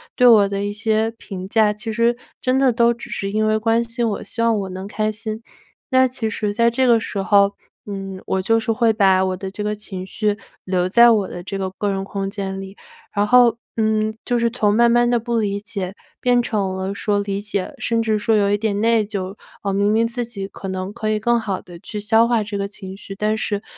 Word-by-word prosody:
对 250 - +4
我 210 -4 +7
的 200 0 -2
一 205 - -3
些 220 +1 0
评 195 -5 -8
价， 215 +1 +3
其 220 +2 -5
实 235 +2 +2 0.2
真 255 +1 +1
的 265 -2 +3
都 235 0 +4
只 235 0 -7
是 195 - -3
因 215 +2 0
为 215 0 +2
关 225 +1 +2
心 230 0 -2
我， 205 - -4
希 230 - -4
望 230 -1 +3
我 190 - -5
能 190 +1 -6
开 215 +1 -1
心。 220 +1 -6 0.5
那 260 0 +5
其 245 -3 -3
实 210 -1 -2
在 235 +1 +3
这 255 +2 +2
个 235 -2 +5
时 215 -2 -4
候， 200 0 +4 0.3
嗯， 195 -2 -6
我 190 - 0
就 225 +4 +2
是 225 0 -1
会 225 0 +2
把 190 -2 +4
我 185 0 -1
的 190 +1 -5
这 205 +2 -6
个 210 0 -1
情 190 -3 -7
绪 210 +1 -1 0.3
留 180 -1 0
在 235 +5 +7
我 210 -4 +3
的 175 - -7
这 195 +2 -5
个 190 -1 -3
个 205 +2 -2
人 195 -1 -2
空 195 0 -4
间 195 -2 -4
里， 195 +1 -10 0.3
然 205 0 +1
后， 245 0 +5 0.2
嗯， 215 0 +1
就 245 - 0
是 235 0 +2
从 215 -4 +1
慢 235 +1 +5
慢 240 0 +4
地 240 - +3
不 235 +1 -2
理 200 -2 -1
解 195 -3 -5 0.3
变 245 -1 +3
成 200 -5 -1
了 190 +1 -3
说 205 0 0
理 200 0 -3
解， 205 -2 -3
甚 230 -1 0
至 215 -1 +1
说 225 +1 +2
有 200 -1 +3
一 205 - +3
点 210 -2 -1
内 230 -1 +3
疚。 200 -2 -5 0.3
嗯， 200 -1 -1
明 200 +1 +2
明 225 +1 +3
自 235 +1 -2
己 200 -4 -6
可 195 - -9
能 190 +1 -4
可 220 -1 -3
以 215 0 +1
更 235 +2 +2
好 200 -4 -3
地 175 -1 -12
去 210 +4 -6
消 220 +2 +4
化 235 -2 +2
这 205 -1 -5
个 200 - -1
情 195 -2 -9
绪， 195 0 -9
但 210 +2 0
是 210 -1 -2
210 Hz, 260 characters per minute, -21 LUFS, 195-230 Hz, 0.5 s, 我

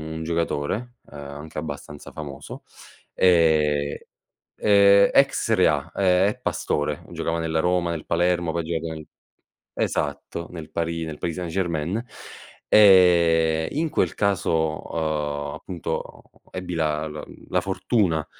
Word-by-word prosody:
un 80 - -5
giocatore, 85 +8 -2
uhm, - - -20
anche 70 +2 -9
abbastanza 75 -1 -7
famoso, 70 -3 -8 0.5
ehm 80 -5 +3 0.6
ehm 100 -1 +5
ex - - +3
serie - - +3
A, - - -1
ehm, 95 0 +3
è 125 - -6
Pastore, 75 - -2
giocava 85 0 -2
nella 80 -1 -1
Roma, 90 +1 +1
nel 80 -3 -5
Palermo, 85 0 +1
poi 85 - -1
ha - - -8
giocato 80 0 -3
nel 80 -1 -9 0.7
esatto, 75 +3 -2
nel 80 -3 -9
Paris 85 0 -2
nel 80 -2 -7
Paris 85 0 -3
Saint-Germain. 85 +2 -2 0.7
Ehm, 85 -5 +5
in 160 +2 -1
quel - - 0
caso, 80 -6 0
uhm, 75 -2 -2
appunto, 90 -3 -4 0.3
uhm, - - -28
ebbi 90 -1 -5
la 75 -1 0
l 75 0 -10
la - - +2
fortuna 85 -10 0
80 Hz, 135 wpm, -24 LUFS, 75-90 Hz, 0.7 s, ehm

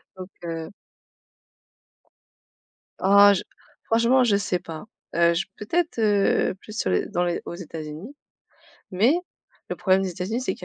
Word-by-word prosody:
Donc, 185 0 -9
heu 165 +1 -5 2.3
Ah 200 +1 +7
je 190 - -1 0.4
franchement 235 +3 +3
je 215 -4 +3
sais 180 -3 -1
pas. 165 +1 -9 0.3
Heu, 170 0 +4
j 170 - -1
peut-être, 325 +5 -1
heu, 205 -3 +2
plus 215 0 -10
sur - - 0
les 90 - +1
dans 175 - -1
les 175 -1 -1
aux - - -6
États-Unis. 165 - -8 0.8
Mais 215 - +3 0.5
le - - -4
problème 190 0 +2
des 190 - -2
États-Unis, 190 +8 -3
c'est 190 - -2
qu'il - - -11
190 Hz, 145 wpm, -24 LUFS, 170-215 Hz, 2.3 s, Ah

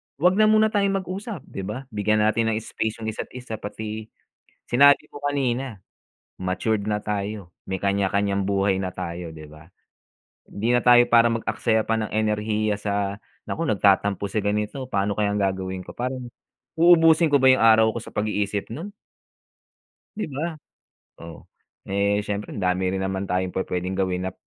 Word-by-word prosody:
huwag 180 +6 +2
na 215 - +6
muna 215 0 +4
tayong 200 -2 +1
mag-usap, 190 - -6
'di - - -9
ba? 115 +6 -5
Bigyan 105 0 +1
natin 110 +1 +2
ng - - -1
space 110 0 -4
yung 110 - -2
isa't 110 - -6
isa. 125 -3 -6
Pati 110 +1 -6 0.6
sinabi 140 +3 +4
ko - - -9
kanina, 135 -7 -2 0.5
matured 100 +3 -1
na 105 0 -1
tayo, 105 -2 -4 0.2
may 95 -1 -4
kanya-kanyang 100 0 0
buhay 100 0 +1
na 95 -1 -3
tayo, 85 -1 -6
'di 80 -1 -11
ba. 75 +4 -16 0.7
Hindi 115 +4 0
na 120 - 0
tayo 120 0 +8
para 115 0 +5
mag-aksaya 115 -1 0
pa 115 - +2
ng 110 -1 -3
enerhiya 105 0 0
sa 100 -1 -2 0.3
naku 165 - -2
nagtatampo 100 - +2
si 105 +1 -2
ganito, 105 +6 -1
pa'no 100 -5 -1
kayang 105 -1 0
gagawin 95 -1 -2
ko? - - -11
Parang, 125 0 -4 0.5
uubusin 165 -1 +5
ko 140 - +5
ba 130 - +5
yung 130 -2 +5
araw 110 0 +6
ko - - 0
sa - - -12
pag-iisip 105 -1 -2
nun? 165 - -7 1.3
'Di 215 - -2
ba? 160 +4 -3 0.7
Oh, 85 0 -11 0.4
eh, 100 +1 +1
siyempre 105 0 -4
andami 90 -1 0
rin 95 - -2
naman 95 0 -3
tayong 90 0 -1
pu-puwedeng 90 0 -2
gawin 95 -1 -1
nap 95 - -5
105 Hz, 165 wpm, -24 LUFS, 100-125 Hz, 1.3 s, tayo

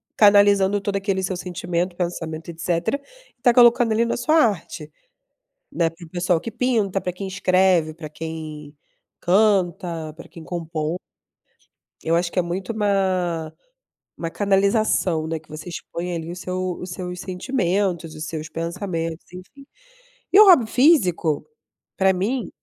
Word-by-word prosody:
canalizando 205 -1 +5
todo 200 0 -2
aquele 195 -1 -1
seu 185 0 -2
sentimento, 180 0 -3
pensamento 165 -3 -4
e - - -3
etcétera, 170 - -1 0.4
e - - -46
tá 240 -1 +5
colocando 240 -1 +5
ali 225 +2 +2
na 235 - -1
sua 310 +6 +1
arte, 185 - 0 0.8
né. 165 -2 +1
Para 165 +1 -13
o - - -16
pessoal 175 -1 0
que 230 - -6
pinta, 220 -5 0
pra 180 - -3
quem 195 +2 -6
escreve, 185 -4 +2
pra 160 -1 -8
quem 155 -1 -7 0.5
canta, 175 -5 +1
pra 165 - -12
quem 165 - -12
compõe. 165 -1 -3 1.0
Eu 165 - +1
acho 170 0 +1
que - - -4
é - - +4
muito 180 +4 -4
uma 185 -6 0 0.7
uma 165 - -3
canalização, 195 -4 +1
né, 160 0 -3
que 155 - -27
você 155 +2 -9
expõe 175 +1 -5
ali 165 0 -5
o - - -6
seu 185 0 -3
os 180 - -7
seus 180 0 -6
sentimentos, 185 - -1
os 155 0 -6
seus 155 -1 -6
pensamentos, 165 0 -4
enfim. 195 +10 -12 0.7
E 390 - +7
o 425 - +10
hobby 335 - +7
físico, 190 - +3 0.5
pra 190 0 +4
mim 210 +5 -2
180 Hz, 155 wpm, -22 LUFS, 165-200 Hz, 1.0 s, o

